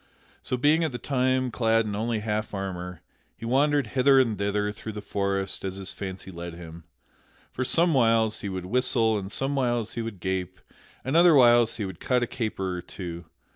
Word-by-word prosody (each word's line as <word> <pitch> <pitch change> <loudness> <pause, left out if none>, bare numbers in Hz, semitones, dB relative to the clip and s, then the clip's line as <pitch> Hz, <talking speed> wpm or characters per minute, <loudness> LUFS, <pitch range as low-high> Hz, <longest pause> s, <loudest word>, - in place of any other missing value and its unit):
So, 125 - -2
being 150 +6 +3
at 160 - 0
that 120 - -7
time 130 -1 +1
clad 115 -1 +2
only 110 +2 -2
in 105 - -5
half 105 -1 -2
armor, 90 -3 -5 0.4
he - - -8
wandered 140 +3 +2
hither 135 +4 +4
and 115 -5 +2
thither 105 +1 -1
through 110 +1 -8
the 105 - -6
forest 100 -1 -2
as 95 -1 -3
his 95 -1 -6
fancy 95 -1 -7
led 85 -1 -7
him. 85 -1 -11 0.7
For 130 - -2
somewhiles 115 -9 +3
he 100 - -4
would 95 -1 -5
whistle 115 0 +2
and 95 -1 -7
somewhiles 125 -4 -1
he 120 - -3
would 115 -4 -6
gape, 95 0 -3 0.5
and 135 +4 -1
otherwhiles 125 -9 +6
he 110 - -3
would 95 -3 -8
cut 125 -1 +1
a - - +2
caper 95 -7 -3
or - - -5
two. 85 -2 -8
110 Hz, 185 wpm, -26 LUFS, 95-125 Hz, 0.7 s, otherwhiles